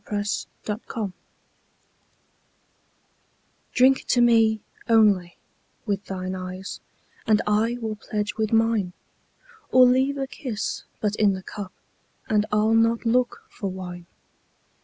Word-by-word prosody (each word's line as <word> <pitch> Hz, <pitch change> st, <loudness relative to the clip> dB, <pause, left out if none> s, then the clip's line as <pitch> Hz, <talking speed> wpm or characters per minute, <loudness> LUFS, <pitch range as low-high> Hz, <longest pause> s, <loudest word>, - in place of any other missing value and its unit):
Y 205 Hz, -1 st, 0 dB
Z 205 Hz, -, -2 dB, 0.2 s
To 210 Hz, 0 st, -3 dB
Celia 210 Hz, -5 st, -3 dB, 2.6 s
DRINK 260 Hz, +1 st, +5 dB
to 245 Hz, -, +3 dB
me, 225 Hz, -2 st, +4 dB, 0.3 s
only, 205 Hz, -6 st, +4 dB, 0.5 s
with 200 Hz, -2 st, -2 dB
thine 185 Hz, -1 st, -4 dB
eyes, 185 Hz, +1 st, -6 dB, 0.5 s
And 215 Hz, -1 st, +5 dB
I 220 Hz, +3 st, +1 dB
will 220 Hz, -2 st, -4 dB
pledge 210 Hz, -1 st, -3 dB
with 220 Hz, -1 st, -1 dB
mine; 225 Hz, -5 st, +2 dB, 0.8 s
Or 255 Hz, 0 st, +8 dB
leave 260 Hz, +3 st, +3 dB
a 270 Hz, -, -1 dB
kiss 245 Hz, -6 st, -4 dB, 0.2 s
but 210 Hz, -1 st, 0 dB
in 205 Hz, -2 st, +4 dB
the 190 Hz, 0 st, -6 dB
cup, 200 Hz, -1 st, -7 dB, 0.6 s
And 210 Hz, -1 st, +2 dB
I'll 215 Hz, +1 st, +3 dB
not 230 Hz, +1 st, +3 dB
look 245 Hz, +1 st, +1 dB
for 200 Hz, -, -4 dB
wine. 180 Hz, -2 st, -7 dB
215 Hz, 125 wpm, -24 LUFS, 200-230 Hz, 2.6 s, Or